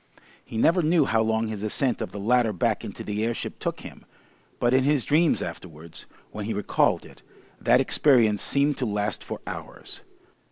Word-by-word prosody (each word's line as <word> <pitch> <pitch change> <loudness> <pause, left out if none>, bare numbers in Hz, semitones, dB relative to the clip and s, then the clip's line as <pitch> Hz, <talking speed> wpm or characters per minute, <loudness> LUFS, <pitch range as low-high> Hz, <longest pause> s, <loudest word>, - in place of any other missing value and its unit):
He 110 - -8
never 170 +10 +3
knew 160 -1 +3
how 110 -2 +1
long 110 0 0
his 110 -2 -5
ascent 115 +3 -1
of - - -4
the 100 - -7
ladder 120 +2 +2
back 90 - -1
into - - -7
the 105 +1 -3
airship 115 +1 -4
took - - -4
him, - - -11 0.6
but 120 +1 +2
in 130 0 +4
his 140 -2 +1
dreams 160 +2 +2
afterwards, 80 -2 -9 0.2
when 105 -1 -6
he 110 0 -3
recalled 105 - +1
it, - - -16 0.4
that - - +4
experience 115 -8 +3
seemed 140 0 +1
to 125 - -2
last 105 0 -1
for - - -7
hours. - - -8
115 Hz, 185 wpm, -25 LUFS, 105-140 Hz, 0.6 s, in